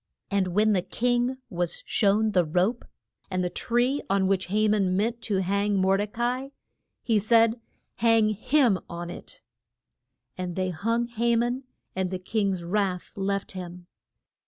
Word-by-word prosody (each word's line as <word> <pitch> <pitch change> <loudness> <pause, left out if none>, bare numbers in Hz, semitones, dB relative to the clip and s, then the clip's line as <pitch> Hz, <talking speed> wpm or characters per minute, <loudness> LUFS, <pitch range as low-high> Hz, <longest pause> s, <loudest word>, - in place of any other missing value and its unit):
And 200 -2 +2
when 210 +4 +3
the 185 - +2
king 245 +6 0
was 175 -2 -2
shown 215 +1 +2
the 180 -3 +3
rope 180 +9 0 0.4
and 185 -1 -1
the 180 - -2
tree 245 +8 0
on 195 0 +2
which 190 -1 +1
Ha 215 +3 +2
man 195 -3 +2
meant 230 +3 -1
to 200 -4 0
hang 200 +2 +1
Mor 190 +1 +3
de 205 +1 -1
ca 225 +3 -5 0.2
i 275 - -14 0.5
he 225 -3 +2
said, 230 +2 +3 0.4
Hang 225 0 +4
him 225 0 +2
on 170 0 -6
it. - - -11 1.0
And 180 -1 -3
they 185 -1 -1
hung 230 +8 0
Ha 235 0 0
man, 245 +3 0 0.3
and 190 -1 -1
the 185 - -3
king's 195 -1 -1
wrath 185 0 -1
left 200 0 -2
him. 180 -1 -8
200 Hz, 160 wpm, -26 LUFS, 185-230 Hz, 1.0 s, Hang